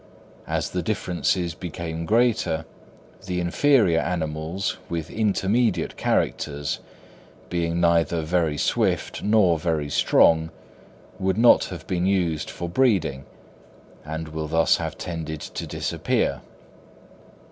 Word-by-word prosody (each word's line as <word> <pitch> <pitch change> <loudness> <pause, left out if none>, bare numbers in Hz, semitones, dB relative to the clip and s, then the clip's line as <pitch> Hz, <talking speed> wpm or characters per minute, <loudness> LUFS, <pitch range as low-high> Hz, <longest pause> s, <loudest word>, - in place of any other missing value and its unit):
As - - -2
the - - -1
differences 90 -1 -1
became 85 -1 -5
greater, 110 -8 +2 0.6
the 90 -1 -1
inferior 90 - +3
animals 80 +1 -2
with 85 -1 -4
intermediate 110 +2 +1
characters, 70 0 -1 0.7
being 85 -1 0
neither 85 -1 +2
very 80 -2 0
swift - - 0
nor 100 -6 +3
very 75 -3 -1
strong, 80 +3 +4 0.7
would 95 +1 0
not 120 +1 +6
have 85 -3 -8
been 90 -1 -1
used 90 -5 0
for 85 - -5
breeding, 85 - +1 0.8
and 80 +1 -5
will 80 0 -4
thus 80 +1 +3
have - - -4
tended 80 -3 -5
to - - -6
disappear. - - -1
85 Hz, 110 wpm, -24 LUFS, 80-95 Hz, 0.8 s, not